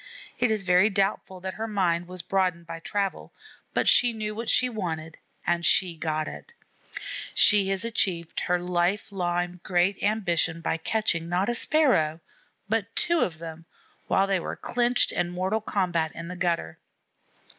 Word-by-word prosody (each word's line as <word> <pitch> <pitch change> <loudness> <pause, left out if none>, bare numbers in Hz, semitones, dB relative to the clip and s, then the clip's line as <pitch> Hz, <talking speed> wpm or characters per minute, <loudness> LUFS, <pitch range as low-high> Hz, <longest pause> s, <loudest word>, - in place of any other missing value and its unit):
It 245 -1 +3
is 215 -2 0
very 185 +3 +4
doubtful 195 -2 -1
that 190 0 -4
her 220 +3 -4
mind 175 -5 0
was 180 -1 -6
broadened 185 -2 0
by 165 0 -7
travel, 195 +3 -3 0.4
but - - 0
she 245 -1 +5
knew 215 -1 -4
what 225 +1 -4
she 255 - +4
wanted 165 -8 -5 0.3
and 175 0 +1
she 180 -1 +3
got 155 -1 -2
it. 470 - -9 0.8
She 205 -2 +5
has 195 +2 +2
achieved 180 -7 -1
her 180 0 0
long 175 +2 +1
time 175 -1 -2
great 180 +2 +1
ambition 175 -6 +1
by 165 0 -1
catching, 170 -2 -1
not 180 +5 +1
a - - +1
Sparrow, 240 - +3 0.5
but 220 0 -2
two 340 -1 +2
of 165 - 0
them, 165 0 -9 0.4
while 195 - +3
they 195 -1 +1
were - - -5
clinched 245 0 +1
in 175 0 -1
mortal 185 +5 -1
combat 170 -6 0
in 170 +1 -7
the 180 - -6
gutter. 170 - -2
185 Hz, 165 wpm, -26 LUFS, 170-210 Hz, 0.8 s, she